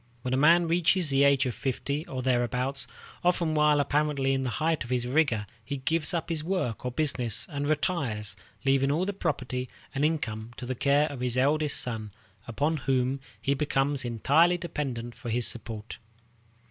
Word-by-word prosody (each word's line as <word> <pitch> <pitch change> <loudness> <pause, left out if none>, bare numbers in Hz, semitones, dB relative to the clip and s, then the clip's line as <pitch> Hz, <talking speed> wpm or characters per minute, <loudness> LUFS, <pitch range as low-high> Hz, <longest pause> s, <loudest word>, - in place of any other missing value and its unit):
When 125 - -1
a - - +4
man 165 +5 +5
reaches 175 -1 +2
the 135 +1 +4
age 140 -2 +4
of 125 - -1
fifty 140 +4 -3
or 130 -1 -4
thereabouts, 125 +2 0 0.4
often 175 -2 +2
while 150 -1 +4
apparently 145 -2 +1
in 135 0 0
the 130 - -1
height 155 +4 0
of 120 - -10
his 125 -1 0
vigor, 125 -5 +2 0.2
he 140 +5 -4
gives 155 +4 0
up 170 -1 -2
his 160 -2 -1
work 170 - -2
or 125 - -1
business 125 -5 0
and 145 0 -2
retires, 135 - 0 0.3
leaving 135 0 +3
all 165 +6 +1
the 200 - -2
property 125 -8 -2 0.2
and 140 - -1
income 120 -8 -1
to 125 - -6
the 130 - -2
care 140 +4 +3
of 140 - -7
his 125 0 -1
eldest 145 +2 +2
son, 110 -3 -3 0.4
upon 145 +7 0
whom 135 -1 0 0.2
he 140 - +1
becomes 140 -1 0
entirely 145 +9 +3
dependent 135 -9 -4
for 120 - -8
his 120 +1 +1
support. 110 -1 -4
135 Hz, 180 wpm, -28 LUFS, 125-155 Hz, 0.4 s, man